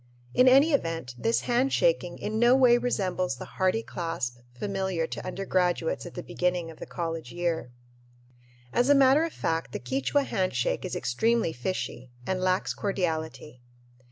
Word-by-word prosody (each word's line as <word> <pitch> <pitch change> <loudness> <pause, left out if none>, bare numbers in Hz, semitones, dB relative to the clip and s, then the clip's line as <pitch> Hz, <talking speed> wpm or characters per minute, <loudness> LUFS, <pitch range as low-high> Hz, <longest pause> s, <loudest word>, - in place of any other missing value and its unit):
In 250 - +5
any 275 +5 +6
event, 165 - -1
this 225 - +1
handshaking 270 - +1
in 215 +1 -3
no 240 +2 +6
way 245 -2 +5
resembles 185 - -1
the 125 - -8
hearty 190 +4 0
clasp 135 -8 -4
familiar 190 +4 -2
to - - -6
undergraduates 185 - -1
at - - -11
the - - -5
beginning 180 -2 -1
of 160 - -15
the - - -7
college 165 -2 -4
year. 170 -7 -2 1.0
As 245 +3 +2
a 285 - +7
matter 275 +3 +5
of 330 - -5
fact 165 - -2
the - - -3
Quichua 130 - 0
handshake 185 - -1
is - - -4
extremely 225 - +1
fishy 125 -2 -4 0.2
and 185 -1 -1
lacks 185 0 +1
cordiality. 160 -8 -3
185 Hz, 155 wpm, -27 LUFS, 165-240 Hz, 1.0 s, a